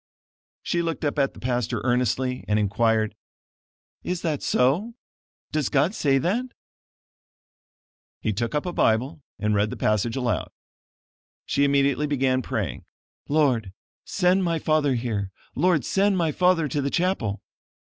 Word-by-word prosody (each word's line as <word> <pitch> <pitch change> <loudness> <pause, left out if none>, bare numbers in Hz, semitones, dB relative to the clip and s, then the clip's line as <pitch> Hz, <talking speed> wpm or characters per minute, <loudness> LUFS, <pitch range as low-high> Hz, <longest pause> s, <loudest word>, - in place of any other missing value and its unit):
She 170 - 0
looked 165 -2 -2
up 145 0 -1
at 135 -1 +1
the - - -11
pastor 120 -2 -1
earnestly, 125 +1 0
and 105 - +2
inquired: 110 +1 +1 0.9
"Is 180 -1 -3
that 155 -4 -1
so? 170 - +1 0.6
Does 150 -3 0
God 145 +8 +2
say 140 -9 +2
that?" 195 - 0 1.7
He 110 - -1
took 115 +7 -2
up 150 - 0
a 180 - -3
Bible 130 +7 +1 0.2
and 105 +1 0
read 105 +1 +2
the - - -6
passage 105 +3 +1
aloud. 125 -4 -1 1.0
She 140 - +1
immediately 140 +1 +2
began 130 -2 +1
praying: 115 -7 -3 0.5
"Lord, 130 -10 +2 0.3
send 185 0 +2
my 170 -2 +1
father 155 -4 +1
here; 110 -5 -2 0.2
Lord, 165 -3 +2
send 195 0 +2
my 165 -3 +1
father 180 -1 +2
to 145 +1 -1
the 140 - -1
chapel." 155 - -1
140 Hz, 140 wpm, -25 LUFS, 115-165 Hz, 1.7 s, and